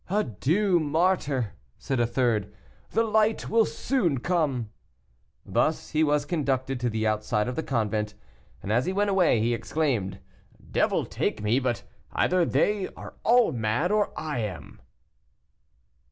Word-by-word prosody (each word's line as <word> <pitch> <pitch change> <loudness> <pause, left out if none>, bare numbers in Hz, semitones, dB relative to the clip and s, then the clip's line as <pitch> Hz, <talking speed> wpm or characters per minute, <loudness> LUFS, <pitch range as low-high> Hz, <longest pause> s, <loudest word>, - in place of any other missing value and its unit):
"Adieu, 180 - +1
martyr," 150 - +1 0.2
said 135 -3 -2
a 120 - +3
third, 120 -4 0 0.4
"the 225 - +2
light 220 0 +1
will 225 0 +4
soon 180 - 0
come." 140 -9 0 0.7
Thus 155 0 0
was 150 -1 +2
he - - -17
conducted 135 -5 -1
to 120 0 0
the 110 0 -2
outside 105 0 0
of 125 - -3
the - - -1
convent, 110 -6 -1 0.5
and 100 - -3
as 120 +3 +2
he 185 - 0
went 205 +1 +1
away 180 - +3
he 115 +2 +1
exclaimed, 115 -6 -1 0.5
"Devil - - +1
take - - -2
me, 110 +5 +2
but 125 -3 -2 0.3
either 180 -1 +2
they 205 +1 +1
are - - -9
all 240 0 +5
mad, 120 - 0
or 210 -1 +2
I 150 -5 -3
am." 95 -10 -6
140 Hz, 145 wpm, -26 LUFS, 115-180 Hz, 0.7 s, all